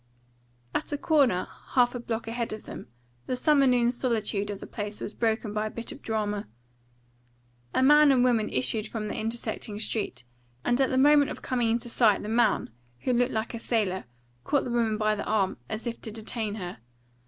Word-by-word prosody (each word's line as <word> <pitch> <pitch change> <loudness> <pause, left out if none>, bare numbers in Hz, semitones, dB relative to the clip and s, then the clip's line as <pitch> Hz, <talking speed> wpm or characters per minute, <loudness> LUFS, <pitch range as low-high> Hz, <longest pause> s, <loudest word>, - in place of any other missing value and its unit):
At - - -2
a 290 - 0
corner, 280 - +2 0.3
half 245 -1 +5
a 245 - -4
block 230 -1 -4
ahead 230 -1 -2
of 215 - -8
them, - - -8 0.4
the - - 0
summer 275 +1 +4
noon 245 -1 +4
solitude 220 -5 -1
of 200 -1 -4
the - - -8
place 205 0 -4
was 205 - -5
broken 220 -2 -1
by 215 0 -1
a - - -4
bit 230 +1 -7
of - - -10
drama. 210 -2 -2 1.3
A - - +4
man 295 +1 +7
and 255 -2 +4
woman 235 -4 +2
issued 215 - -1
from 215 -1 -4
the - - -3
intersecting 220 -2 -4
street, 210 - -2 0.4
and 245 +2 +2
at 265 - +3
the 260 - 0
moment 290 +1 +6
of - - -7
coming 245 -3 0
into 235 +2 -1
sight 225 -3 +3
the 210 - -5
man, 235 - +2 0.3
who 255 - +1
looked 245 +1 +2
like 220 +2 -2
a 230 - -4
sailor, 205 - -1 0.4
caught 285 - +1
the 245 - -4
woman 230 -2 +1
by 215 0 +2
the 210 - -3
arm, 205 -3 +1
as 220 +3 -4
if 235 -1 -4
to 220 - -5
detain 220 -1 -4
her. 180 - -6
225 Hz, 200 wpm, -27 LUFS, 215-245 Hz, 1.3 s, man